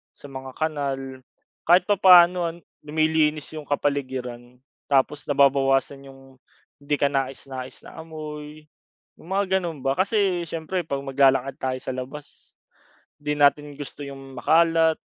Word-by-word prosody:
sa 145 - -13
mga 130 -1 -8
kanal, 135 -4 -3 0.5
kahit 175 +2 +6
papaano 180 -3 +6
an 165 +1 -6 0.2
lumilinis 155 0 0
'yung 155 -2 -8
kapaligiran. 130 -4 -3 0.3
Tapos 140 +1 +1
nababawasan 140 0 +2
'yung, 135 -1 -16 0.4
'di 145 +1 -1
kanais-nais 135 -2 -3
na - - -12
amoy. 155 -1 -8 0.6
'Yung - - -16
mga 190 -1 +2
gano'n 165 -7 -6
ba. 135 +3 0
Kasi 190 -4 +1
siyempre 165 +2 -4
pag 140 -2 -3
maglalakad 135 -1 +2
tayo 130 0 -2
sa - - -3
labas, 130 +3 -9 0.6
'di 150 0 -2
natin 145 0 +3
gusto 145 0 -8
'yung 135 -1 -9
makalat, 165 +3 +3
145 Hz, 125 wpm, -24 LUFS, 135-160 Hz, 0.6 s, kahit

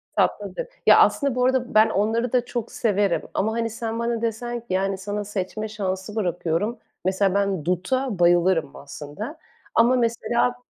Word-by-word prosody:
Tatlıdır. - - 0 0.2
Ya, - - +8
aslında 280 -4 +3
bu 250 0 +2
arada 255 -1 +1
ben 215 +1 +6
onları 225 +4 0
da 245 -1 +2
çok 235 -2 -4
severim. 205 -4 +1
Ama, 215 +3 0
hani, 230 0 -1
sen 225 +1 -4
bana 235 -1 -1
desen 235 +1 -2
ki, 235 - -19
yani, 195 +1 0
"Sana 205 +2 -4
seçme 210 +2 -4
şansı 195 0 -4
bırakıyorum." 180 +2 -1 0.3
Mesela, 190 0 +2
ben 200 -6 0
duta 190 +5 -1
bayılırım, 175 -3 +3
aslında. 150 - -8 0.4
Ama 240 +3 +5
mesela 235 +1 +1
215 Hz, 155 wpm, -24 LUFS, 190-235 Hz, 0.4 s, Ya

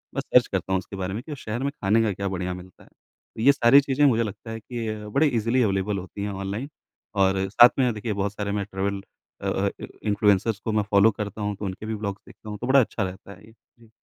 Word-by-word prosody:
मैं - - 0
सर्च - - +4
करता 95 - -2
हूँ 95 - +2
उसके 95 - -9
बारे 95 -1 -3
में 110 - -4
कि 155 - -10
उस 140 - -7
शहर 110 +4 -3
में 140 - 0
ख़ाने 110 -4 +1
का 110 - +1
क्या 100 +1 -3
बढ़िया 90 -1 -3
मिलता 90 0 -12
है। - - -21
तो - - -15
ये 135 +5 +7
सारी 135 0 +6
चीज़ें 140 +1 +2
मुझे 115 -4 +4
लगता 105 +1 -7
है 115 - -5
कि 115 0 -5
अ, 105 -1 -5
बड़े 140 +8 +3
ईज़िली 120 0 +1
अवेलेबल 100 -1 0
होती 95 +2 -6
हैं 100 - -2
ऑनलाइन 100 +7 -4 0.5
और 95 -1 +2
साथ 120 +4 +8
में 125 -3 +3
देखिए, 105 +1 -3
बहुत 100 0 -2
सारे 105 -1 -3
मैं 100 -1 -1
ट्रैवल 100 +1 -2 0.4
अ - - -1
अ, - - 0 0.3
इन्फ्लुएंसर्स 105 0 +2
को 110 - -3
मैं 105 -1 +1
फॉलो 100 +2 +6
करता 105 0 -6
हूँ 105 -1 -2
तो 105 - -6
उनके 95 +2 -5
भी 110 - -3
व्लॉग्स 100 -1 -4
देखता 110 - -12
हूँ 105 - -5
तो 125 - -3
बड़ा 135 +1 +6
अच्छा 110 -4 0
रहता 95 +1 -7
है 100 +2 -17
ये। 110 - -17 0.3
जी। 115 -1 -20
105 Hz, 260 wpm, -25 LUFS, 100-115 Hz, 0.5 s, साथ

